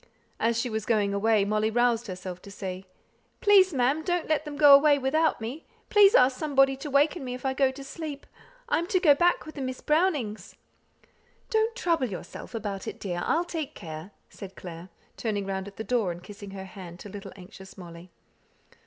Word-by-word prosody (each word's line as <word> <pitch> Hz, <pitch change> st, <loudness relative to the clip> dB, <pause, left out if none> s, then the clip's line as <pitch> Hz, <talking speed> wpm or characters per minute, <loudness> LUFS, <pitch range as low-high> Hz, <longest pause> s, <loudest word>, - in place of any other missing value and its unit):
As 230 Hz, +1 st, +1 dB
she 245 Hz, -, -1 dB
was 220 Hz, -2 st, -4 dB
going 210 Hz, -3 st, +1 dB
away 210 Hz, 0 st, +2 dB
Molly 215 Hz, +1 st, +1 dB
roused 240 Hz, 0 st, +1 dB
herself 185 Hz, -1 st, -7 dB
to -, -, -12 dB
say, 190 Hz, -1 st, -6 dB, 0.5 s
"Please, 400 Hz, -4 st, +5 dB
ma'am, 270 Hz, +2 st, +1 dB
don't 350 Hz, 0 st, -1 dB
let 310 Hz, 0 st, 0 dB
them 300 Hz, -1 st, -6 dB
go 290 Hz, -2 st, +8 dB
away 285 Hz, +1 st, +7 dB
without 295 Hz, +4 st, +1 dB
me. 240 Hz, +8 st, -6 dB, 0.3 s
Please 415 Hz, +1 st, +7 dB
ask 255 Hz, -, +4 dB
somebody 270 Hz, -3 st, +3 dB
to 295 Hz, +2 st, -6 dB
waken 290 Hz, +3 st, +2 dB
me 250 Hz, -1 st, -4 dB
if 255 Hz, -, -10 dB
I 265 Hz, -, +1 dB
go 270 Hz, 0 st, +3 dB
to 270 Hz, +1 st, -9 dB
sleep. 295 Hz, 0 st, -7 dB, 0.4 s
I 480 Hz, -, +2 dB
am 340 Hz, -, -3 dB
to 370 Hz, -, +2 dB
go 320 Hz, -6 st, +6 dB
back 350 Hz, +4 st, +2 dB
with 310 Hz, -1 st, -11 dB
Miss 260 Hz, -2 st, -4 dB
Brownings." 300 Hz, -, 0 dB, 1.0 s
"Don't 440 Hz, +1 st, +1 dB
trouble 335 Hz, -, 0 dB
yourself 195 Hz, +4 st, -8 dB
about 200 Hz, -3 st, -4 dB
it, -, -, -6 dB
dear; 175 Hz, -3 st, -3 dB
I'll 335 Hz, +2 st, +1 dB
take 320 Hz, -5 st, -5 dB
care," 160 Hz, 0 st, -8 dB, 0.2 s
said 190 Hz, -1 st, -11 dB
Clare, 175 Hz, 0 st, -9 dB, 0.3 s
turning 205 Hz, -3 st, -2 dB
round 190 Hz, 0 st, -4 dB
at 200 Hz, -, -12 dB
the 220 Hz, -, -4 dB
door, 225 Hz, -6 st, 0 dB
and 175 Hz, +1 st, -9 dB
kissing 205 Hz, 0 st, -10 dB
her 195 Hz, -1 st, -8 dB
hand 180 Hz, -2 st, -10 dB
to 205 Hz, -, -9 dB
little 200 Hz, 0 st, -9 dB
anxious 190 Hz, 0 st, -13 dB
Molly. 170 Hz, -1 st, -11 dB
245 Hz, 195 wpm, -27 LUFS, 195-300 Hz, 1.0 s, go